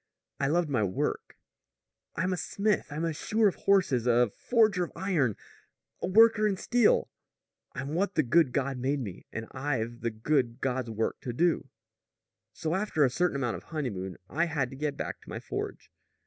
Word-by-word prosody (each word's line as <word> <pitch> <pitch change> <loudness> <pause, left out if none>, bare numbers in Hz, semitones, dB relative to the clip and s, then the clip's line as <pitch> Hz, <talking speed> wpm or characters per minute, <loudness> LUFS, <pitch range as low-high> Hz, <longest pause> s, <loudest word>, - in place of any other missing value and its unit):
I 140 - +1
loved 170 +3 +2
my 130 -6 0
work. 95 -2 -2 0.8
I'm 185 +2 0
a - - -2
smith. 205 +3 0
I'm 155 +3 -2
a 165 - -1
shoer 215 +7 +2
of 195 - +2
horses, 160 - +2
a 120 -2 +4
forger 220 -7 +3
of 175 - -5
iron, 160 - +1 0.7
a - - -1
worker 220 +2 +6
in 195 -2 0
steel. 240 +2 +3 0.6
I'm 135 0 -4
what 195 +4 0
the 155 - +3
good 140 +2 +4
God 135 0 -1
made 135 +3 0
me, 100 -8 -7
and 115 - -5
I've 130 -4 -3
the 115 - 0
good 120 +2 0
God's 130 -3 -1
work 110 0 -2
to 120 - -4
do! 165 -1 +1 0.8
"So 160 0 -3
after 190 -5 +1
a 130 - +1
certain 175 +3 +1
amount 120 -6 -1
of - - -13
honeymoon 100 - -4
I 165 +6 +1
had 145 -7 -1
to - - -8
get 145 0 -2
back - - -5
to - - -15
my - - -5
forge. - - -6
145 Hz, 185 wpm, -29 LUFS, 125-180 Hz, 0.8 s, worker